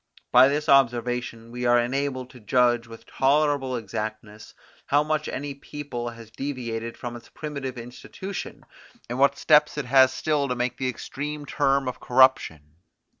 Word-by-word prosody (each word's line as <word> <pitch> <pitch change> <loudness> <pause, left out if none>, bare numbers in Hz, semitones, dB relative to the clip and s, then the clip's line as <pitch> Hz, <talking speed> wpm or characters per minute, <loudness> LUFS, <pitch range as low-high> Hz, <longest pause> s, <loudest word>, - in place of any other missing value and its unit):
By 125 +1 +8
this 150 +2 -1
observation 120 -3 +1
we 125 0 -2
are 120 0 +5
enabled 130 +1 -2
to 130 - -14
judge 120 +1 +2
with 115 0 -12
tolerable 140 -1 +1
exactness, 110 -1 -6 0.3
how 145 +1 +3
much 155 0 -1
any 145 +1 -4
people 140 -3 -6
has 115 -1 -12
deviated 115 -4 -5
from 120 -1 -6
its 120 - -12
primitive 140 -4 -6
institution, 125 +11 -8 0.4
and 120 +2 -4
what 140 +1 +4
steps 150 -1 +4
it 150 - -2
has 130 +1 +5
still 150 -3 0
to 125 - -2
make 125 0 -2
to 130 - -3
the - - +1
extreme 145 +4 -6
term 135 -1 +1
of 125 - -4
corruption. 85 - +2
130 Hz, 160 wpm, -25 LUFS, 120-140 Hz, 0.4 s, By